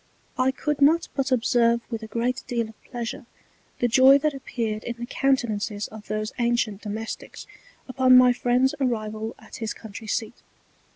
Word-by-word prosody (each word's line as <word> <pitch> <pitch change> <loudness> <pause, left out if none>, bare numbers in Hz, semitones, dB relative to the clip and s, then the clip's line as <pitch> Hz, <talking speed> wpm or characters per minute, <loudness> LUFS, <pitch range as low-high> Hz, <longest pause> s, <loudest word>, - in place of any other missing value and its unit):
I 255 +1 +2
could 285 +2 -2
not 320 +4 +4
but 270 -1 -1
observe 235 -1 +3
with 225 -1 -3
a 220 - -7
great 235 +3 -2
deal 235 -2 -1
of 220 - -17
pleasure 240 0 -6 0.5
the 245 - +1
Joy 260 +3 +7
that 300 +1 0
appeared 225 -5 -4
in 240 - -4
the 240 - -5
Countenances 235 -6 0
of 215 -1 -12
these 215 +1 -3
ancient 235 -4 0
Domesticks 220 +1 -6 0.4
upon 255 -1 +5
my 250 -1 +7
Friend's 250 +2 +2
Arrival 220 -3 -2
at - - -12
his 225 -1 -4
Country 220 0 -10
Seat. 220 +2 -3
235 Hz, 165 wpm, -25 LUFS, 220-260 Hz, 0.5 s, Joy